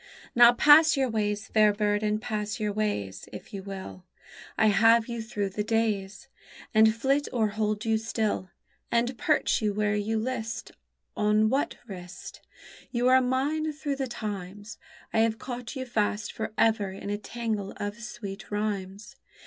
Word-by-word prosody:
_Now 240 0 +7
pass 305 +1 +7
your 265 -2 +1
ways, 210 -2 -1
fair 215 -1 +5
bird, 205 0 0
and 210 0 0
pass 210 -1 -3
your 210 -1 -1
ways, 100 - -3
If - - -10
you 195 - -5
will; 190 -1 -8 0.5
I 220 - +4
have 225 +2 +5
you 235 -1 -4
through 210 -3 -3
the 210 +2 -3
days. 210 -3 -1 0.5
And 220 0 +5
flit 275 +5 +1
or 225 -4 +1
hold 215 +1 -2
you 220 -1 +2
still, 220 -4 -2 0.4
And 240 +2 +1
perch 310 -8 +2
you 210 -2 0
where 210 0 +1
you 210 +2 -1
list 230 0 -4 0.4
On 210 +1 +3
what 270 +4 0
wrist, 185 -3 -9 0.5
You 245 0 +1
are 260 0 +6
mine 285 +5 0
through 290 -2 -3
the 270 -1 -2
times. 205 -2 -6 0.3
I - - +2
have 225 0 +2
caught 245 +1 -6
you 260 -1 -4
fast 215 -3 -1
for 220 0 -4
ever 220 -3 +2
in 195 +1 -6
a 205 - -1
tangle 215 -3 -3
of 205 +2 -4
sweet 215 -2 -7
rhymes. 205 -1 -4
215 Hz, 165 wpm, -27 LUFS, 205-235 Hz, 0.5 s, Now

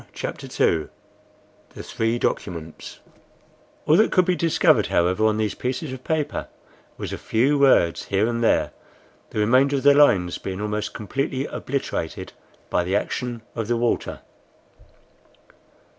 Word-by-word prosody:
CHAPTER - - -6
II 80 -2 +1 0.9
THE - - -7
THREE 115 +1 -1
DOCUMENTS 85 -8 -4 0.8
ALL 155 - +5
that 220 - +4
could 185 - +4
be 180 0 +1
discovered, 165 -2 +3
however, 90 +5 +2
on 110 0 +1
these 110 -2 -1
pieces 130 +3 -4
of 130 -1 -9
paper 155 -2 -2 0.5
was - - -5
a - - -5
few 135 +6 +1
words 130 -12 +3
here 100 +1 +1
and 115 0 -1
there, - - +2 0.6
the - - -8
remainder 130 +6 +3
of 135 - -2
the 145 0 +7
lines 95 -12 +3
being 95 0 -5
almost 105 0 -3
completely 135 +5 -2
obliterated 130 - -4 0.4
by 90 - +2
the 95 +3 -1
action 120 +2 -3
of 115 -3 -4
the 120 0 +1
water. 120 0 -1
115 Hz, 145 wpm, -23 LUFS, 105-140 Hz, 0.9 s, the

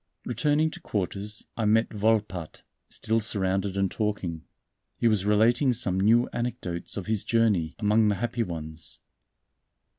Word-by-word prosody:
Returning 150 +2 +1
to - - -9
quarters 100 +1 -2
I 115 - -1
met 110 +2 +2
Volpatte, 105 -6 -1 0.3
still 110 +1 0
surrounded 95 -2 0
and 95 -1 +1
talking. 95 -7 -3 0.5
He 120 - +2
was 105 -3 +2
relating 120 +5 +4
some 100 -6 -1
new 115 +5 +4
anecdotes 105 -9 -4
of 95 - -4
his 110 -2 0
journey 105 -9 +1
among 105 +1 +3
the 105 - +2
happy 120 +3 -2
ones. 80 -5 -3
105 Hz, 140 wpm, -27 LUFS, 95-115 Hz, 0.5 s, relating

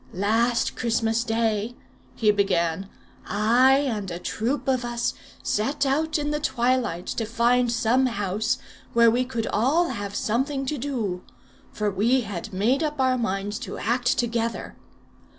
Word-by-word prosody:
"Last 225 +5 +1
Christmas 230 -1 0
day," 225 0 0 0.4
he 215 -2 +3
began, 190 -2 0 0.4
"I 240 +6 +4
and 210 -6 -3
a 170 - -4
troop 235 +10 -2
of 255 -2 +1
us 240 0 -1 0.3
set 275 +7 0
out 310 +4 +1
in 295 0 -2
the 300 - -1
twilight 240 - 0
to 230 - -2
find 235 +2 +2
some 240 +3 +2
house 215 +2 -1 0.4
where 235 -1 +6
we 245 +2 +2
could 240 -3 -3
all 295 +11 +2
have 205 -4 -5
something 270 +5 -1
to 290 +1 -2
do; 230 -9 -2 0.5
for 210 -1 -1
we 230 +7 +2
had 205 -1 -6
made 225 +9 +1
up 300 -2 -2
our 260 -1 +3
minds 205 -2 -2
to - - -6
act 245 +1 +1
together. 235 -1 -2
235 Hz, 150 wpm, -25 LUFS, 210-255 Hz, 0.5 s, where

